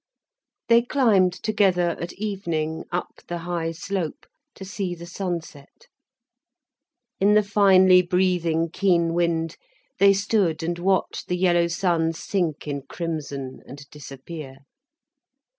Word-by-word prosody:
They 235 Hz, 0 st, +6 dB
climbed 225 Hz, -8 st, +3 dB
together, 190 Hz, -4 st, +1 dB
at 170 Hz, -, -5 dB
evening, 170 Hz, -7 st, -3 dB
up 175 Hz, +1 st, -4 dB
the 175 Hz, -, -3 dB
high 170 Hz, -1 st, -3 dB
slope, 170 Hz, 0 st, -4 dB, 0.3 s
to 190 Hz, -, -9 dB
see 190 Hz, -2 st, -4 dB
the 170 Hz, 0 st, -10 dB
sunset. 170 Hz, -, -6 dB, 1.3 s
In 205 Hz, +2 st, +4 dB
the 210 Hz, -, +5 dB
finely 190 Hz, -2 st, +5 dB
breathing, 175 Hz, -3 st, 0 dB
keen 175 Hz, -3 st, +2 dB
wind 165 Hz, -1 st, 0 dB, 0.4 s
they 200 Hz, +1 st, +6 dB
stood 195 Hz, -5 st, 0 dB
and 170 Hz, +1 st, -2 dB
watched 190 Hz, +1 st, 0 dB
the 180 Hz, -, -1 dB
yellow 175 Hz, -2 st, +3 dB
sun 170 Hz, -2 st, 0 dB
sink 165 Hz, -3 st, -2 dB
in 140 Hz, -1 st, -3 dB
crimson 140 Hz, -3 st, -5 dB
and 140 Hz, +1 st, -11 dB
disappear. 135 Hz, -1 st, -10 dB
175 Hz, 120 wpm, -24 LUFS, 165-190 Hz, 1.3 s, They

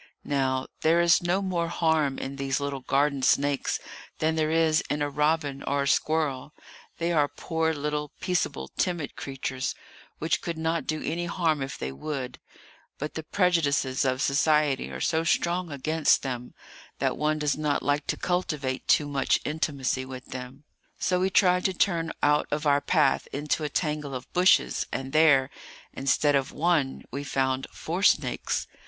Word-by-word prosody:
Now 130 Hz, -2 st, 0 dB, 0.2 s
there 165 Hz, +2 st, +4 dB
is 170 Hz, -1 st, +5 dB
no 175 Hz, +3 st, 0 dB
more 175 Hz, -3 st, -1 dB
harm 160 Hz, -5 st, +1 dB
in 135 Hz, +1 st, -5 dB
these 135 Hz, 0 st, -1 dB
little 140 Hz, -1 st, -3 dB
garden 140 Hz, +1 st, +1 dB
snakes 140 Hz, +1 st, +2 dB, 0.4 s
than 160 Hz, +1 st, +1 dB
there 155 Hz, -1 st, 0 dB
is 160 Hz, -1 st, +3 dB
in 145 Hz, 0 st, 0 dB
a 145 Hz, -, -2 dB
robin 150 Hz, -1 st, 0 dB
or 140 Hz, 0 st, 0 dB
a -, -, -2 dB
squirrel—they 155 Hz, +3 st, -2 dB
are 150 Hz, -4 st, +3 dB
poor 160 Hz, +1 st, -1 dB
little, 150 Hz, 0 st, -2 dB
peaceable, 180 Hz, -6 st, -1 dB
timid 175 Hz, -5 st, -1 dB
creatures, 135 Hz, -1 st, -4 dB, 0.4 s
which 160 Hz, +2 st, 0 dB
could 170 Hz, -2 st, -4 dB
not 160 Hz, +1 st, -1 dB
do 155 Hz, 0 st, -2 dB
any 170 Hz, +3 st, -2 dB
harm 165 Hz, -4 st, 0 dB
if 135 Hz, 0 st, -4 dB
they 65 Hz, -, -4 dB
would; 130 Hz, -, -5 dB, 0.6 s
but 150 Hz, +2 st, -5 dB
the 160 Hz, -, -4 dB
prejudices 155 Hz, -7 st, +1 dB
of 130 Hz, +1 st, 0 dB
society 150 Hz, 0 st, +2 dB
are -, -, -6 dB
so 160 Hz, 0 st, +1 dB
strong 170 Hz, +1 st, 0 dB
against 155 Hz, +2 st, +2 dB
them 125 Hz, -2 st, -5 dB, 0.4 s
that -, -, 0 dB
one 155 Hz, 0 st, 0 dB
does 150 Hz, -1 st, 0 dB
not 150 Hz, -1 st, -1 dB
like 145 Hz, 0 st, 0 dB
to -, -, -1 dB
cultivate 150 Hz, -7 st, -2 dB
too 150 Hz, -, +4 dB
much 140 Hz, -2 st, +1 dB
intimacy 140 Hz, -4 st, -1 dB
with 130 Hz, -1 st, -8 dB
them. 130 Hz, +2 st, -8 dB, 0.3 s
So 180 Hz, 0 st, +1 dB
we 190 Hz, +1 st, +2 dB
tried 180 Hz, -1 st, +4 dB
to 190 Hz, -, +2 dB
turn 165 Hz, -4 st, +1 dB
out 150 Hz, 0 st, +3 dB
of 150 Hz, +1 st, -2 dB
our 145 Hz, -1 st, +4 dB
path 150 Hz, +1 st, +2 dB
into 150 Hz, +2 st, -1 dB
a 150 Hz, -, -1 dB
tangle 150 Hz, -3 st, -2 dB
of 125 Hz, 0 st, -8 dB
bushes; 180 Hz, +1 st, +3 dB
and 135 Hz, 0 st, -4 dB
there, 145 Hz, -4 st, +5 dB, 0.4 s
instead 140 Hz, +2 st, +2 dB
of 135 Hz, -1 st, +1 dB
one, 155 Hz, -5 st, 0 dB
we 140 Hz, +3 st, -4 dB
found 135 Hz, -1 st, -1 dB
four 175 Hz, +4 st, -4 dB
snakes. -, -, +2 dB
150 Hz, 165 wpm, -27 LUFS, 135-160 Hz, 0.6 s, is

